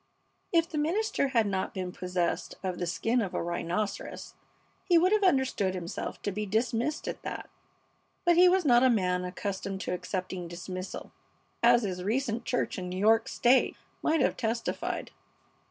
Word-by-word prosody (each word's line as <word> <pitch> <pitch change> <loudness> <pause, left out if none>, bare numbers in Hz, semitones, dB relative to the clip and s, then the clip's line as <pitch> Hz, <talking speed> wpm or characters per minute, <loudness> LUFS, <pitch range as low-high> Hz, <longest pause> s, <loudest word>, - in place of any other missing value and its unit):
If 330 -1 +3
the 310 -3 -3
minister 345 0 +1
had 235 -5 +2
not 195 -2 -2
been 185 -1 -3
possessed 180 -1 -2
of 185 -2 -3
the 175 - -1
skin 230 +7 +1
of 195 -4 -3
a - - -1
rhinoceros 175 +4 -3 0.5
he 350 -3 +4
would 360 +3 +4
have 425 -1 +3
understood 265 - +2
himself 175 -1 -5
to 205 - -1
be 210 +2 -3
dismissed 235 +7 0
at - - -4
that; - - -6 0.7
but 345 0 +5
he 360 +1 +7
was 370 -1 +2
not 240 -3 +6
a 260 - +5
man 180 -5 +1
accustomed 190 +1 -4
to - - -2
accepting 180 -1 -4
dismissal, 185 +2 -6 0.5
as 240 0 +5
his 180 -3 -3
recent 235 +2 -1
church 245 - -1
in 180 -1 -5
New 180 - -4
York 225 +3 +4
State 255 +2 +3 0.2
might 315 -1 +2
have - - +2
testified. 230 0 -2
215 Hz, 170 wpm, -29 LUFS, 185-265 Hz, 0.7 s, he